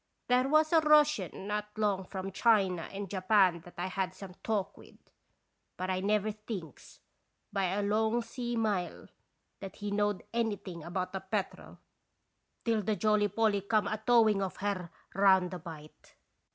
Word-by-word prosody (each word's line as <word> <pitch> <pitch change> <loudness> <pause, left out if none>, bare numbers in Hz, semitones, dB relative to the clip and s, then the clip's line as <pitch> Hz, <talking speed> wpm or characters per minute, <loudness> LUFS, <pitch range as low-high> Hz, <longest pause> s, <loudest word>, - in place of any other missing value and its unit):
" - - -49
There 250 +2 +3
was 310 +2 +4
a 325 - +7
Russian 300 - +3
not 210 0 -2
long 200 -3 0
from 190 0 -5
China 195 -6 +2
and 200 0 -5
Japan 185 -2 +3
that 175 - -14
I 175 - -2
had 185 0 -2
some 195 -2 -9
talk 210 -4 -1
with; - - -16 0.8
but 185 +1 -2
I 185 - 0
never 210 +2 +1
thinks, 205 - -9 0.5
by 195 -2 +1
a 195 +3 -1
long 220 +3 +1
sea 240 +1 -4
mile, 210 -6 -2 0.5
that 195 -1 -8
he 205 -1 -5
knowed 205 -1 0
anything 205 -7 -2
about 180 +3 -3
the 190 - -2
Petrel, 195 0 -4 0.9
till 225 -2 +2
the 210 +2 0
Jolly 210 0 +2
Polly 205 0 +1
come 215 +2 +1
a 215 - -2
towing 220 -3 +4
of 190 -1 -3
her 190 -3 -2 0.2
round 190 -2 +4
the 180 - -5
bight. 155 -3 -12
205 Hz, 165 wpm, -31 LUFS, 185-220 Hz, 0.9 s, a